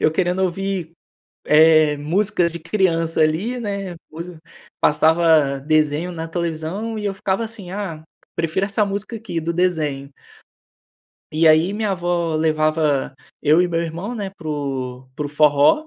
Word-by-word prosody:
eu 155 - +3
querendo 180 +2 0
ouvir, 185 -2 -3 0.6
eh, 155 -1 +6
músicas 175 +3 +1
de 170 - -6
criança 165 -3 0
ali, 175 +11 +1
né, 200 -5 -4 0.2
coisa 170 +1 -8 0.4
passava 155 -2 +3
desenho 155 +3 +1
na 165 -1 -5
televisão 170 +7 -3
e 210 - -5
eu 200 - -1
ficava 195 +3 -1
assim: 205 -5 -9
"Ah, 185 -6 -5 0.3
prefiro 170 +4 0
essa 210 +1 +1
música 205 +3 -4
aqui, 215 -7 -4
do 170 +1 -2
desenho". 150 -6 -1 1.2
E 160 +1 +2
aí, 160 +5 +5
minha 215 -1 -1
avó 175 -3 -1
levava 155 -3 +1 0.3
eu 155 +3 +5
e 180 - +2
meu 170 -1 0
irmão, 170 +8 -5
né, 200 -4 -4
para 170 -5 -9
o 130 -3 -4
para 150 - -3
o - - -7
forró, 150 - +4
165 Hz, 150 wpm, -21 LUFS, 155-190 Hz, 1.2 s, eh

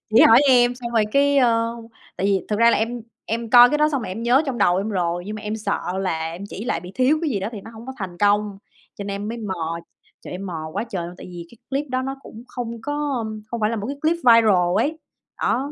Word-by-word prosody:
Chị 230 - +8
hỏi 230 +3 +8
em 245 -1 +5
xong 245 -1 -6
rồi 225 -2 +3
cái, 280 0 +4
ơ 230 -2 +2 0.4
tại 195 - -1
vì 195 -2 +1
thật 210 - 0
ra 230 +1 +6
là - - +2
em 235 +2 -2 0.2
em 230 0 -3
coi 245 0 +9
cái 300 - +1
đó 300 0 +4
xong 280 -5 -2
rồi - - -5
em 200 +5 -5
nhớ 250 +5 +4
trong 260 -3 -3
đầu 180 -3 +3
em 195 +3 -1
rồi, 175 -3 -1
nhưng 215 +1 -5
mà 215 - -8
em 210 0 -3
sợ 215 - -2 0.2
là 165 -4 -2
em 180 +4 -8
chỉ 210 - -7
lại 245 - -1
bị 180 +1 -10
thiếu 260 +5 +3
cái 310 - 0
gì 205 -6 -1
đó 195 - -2
thì 210 - -7
nó 225 - -11
hông 230 +2 -12
có 265 - -5
thành 185 -4 -6
công, 205 0 +1 0.4
cho 200 - -6
nên 200 0 -4
em 210 - -4
mới 235 +1 -5
mò, 170 -6 -4 0.4
trời, - - -9
em 190 +2 -6
mò 160 -3 -5
quá - - -2
trời 180 -5 -3
luôn. 175 - -9
Tại - - -10
vì 175 -2 -9 0.2
clip 280 +2 -1
đó 255 0 -1
nó 270 +1 -4
cũng 225 - -11
không 235 -2 -6
có, 290 0 -2
ờm, 215 -2 -5
hông 235 - -3
phải 210 - +1
là 230 - -2
một 210 0 -4
cái 280 - -4
clip 320 +2 +2
viral 220 - +4
ấy. 310 +8 0 0.4
Á, - - +1
225 Hz, 280 wpm, -22 LUFS, 195-245 Hz, 0.4 s, coi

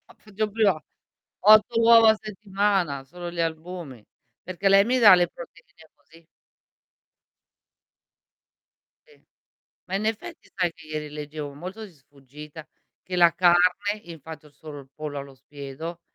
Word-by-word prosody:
Faccio 215 0 -4
prima 200 -7 +1 0.6
8 215 +3 +5
uova 230 -1 +7
a 220 - -1
settimana 195 -8 -2
solo 175 +5 -9
gli 170 - -3
albumi, 160 -6 -6 0.4
perché 185 +2 -2
lei 195 +1 +5
mi 255 +1 +1
dà 205 -5 +9
le 175 -1 +2
proteine 165 -1 -15
così. 165 0 -22 2.8
Sì. 460 -2 -24 0.6
Ma 190 - -4
in 210 - -2
effetti 220 -1 -5
sai 180 -3 -1
che - - -17
ieri 155 -1 -5
leggevo 150 -1 -7
molto 185 +9 -8
di 195 - -15
sfuggita, 145 +2 -14 0.4
che 185 - -6
la 170 -2 +5
carne 180 +4 +2
infatti 160 -2 -11
ho 145 - -22
solo 145 0 -11
il 135 - -15
pollo 150 -2 -6
allo 140 0 -10
spiedo, 145 +5 -9
175 Hz, 140 wpm, -24 LUFS, 150-200 Hz, 2.8 s, dà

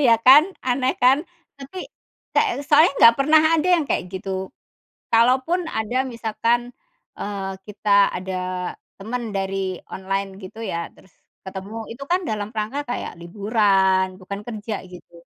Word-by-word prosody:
ya, 240 -5 +5
kan 270 +4 +10 0.2
aneh 255 +1 0
kan. 265 +4 +4 0.3
Tapi, 280 +7 -8 0.5
ka 430 -8 +2
soalnya 305 +1 +5
nggak 230 0 +8
pernah 305 +3 +5 0.2
ada 325 +3 0
yang 325 - 0
kayak - - -1
gitu. 190 0 -4 0.6
Kalaupun 260 +10 +3
ada 240 +4 -1
misalkan, 235 0 -1 0.4
eee, 200 -1 -4
kita 200 -1 +3
ada 185 0 -4 0.2
teman 230 +2 -4
dari 195 -1 -2
online 195 +1 -3
gitu 190 +4 -10
ya, 170 -5 -3
terus 190 - -22 0.3
ketemu, 190 +3 -7 0.2
itu 240 +4 -8
kan 365 +1 +3
dalam 210 -1 -3
rangka 225 +7 -3
kayak 245 - -4
liburan, 190 -1 +2
bukan 200 +2 -6
kerja, 215 -2 -5
gitu. 175 -1 -15
215 Hz, 135 wpm, -22 LUFS, 190-255 Hz, 0.6 s, kan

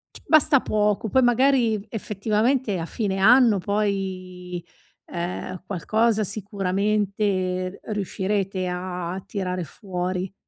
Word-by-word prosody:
c - - -11
basta 305 -3 +6
poco, 210 +1 0
poi 260 +3 +3
magari, 245 -4 +3
effettivamente, 215 +2 0
a 165 - -3
fine 195 0 -2
anno 230 +2 +6
poi, 185 -3 -3 0.4
ehm, 175 +1 -5
qualcosa 215 +4 +1
sicuramente 200 -2 -1
r - - -7
riuscirete 195 -1 -2
a 180 0 -4
tirare 185 -3 -3
fuori. 185 +1 -4
200 Hz, 105 wpm, -24 LUFS, 185-215 Hz, 0.4 s, basta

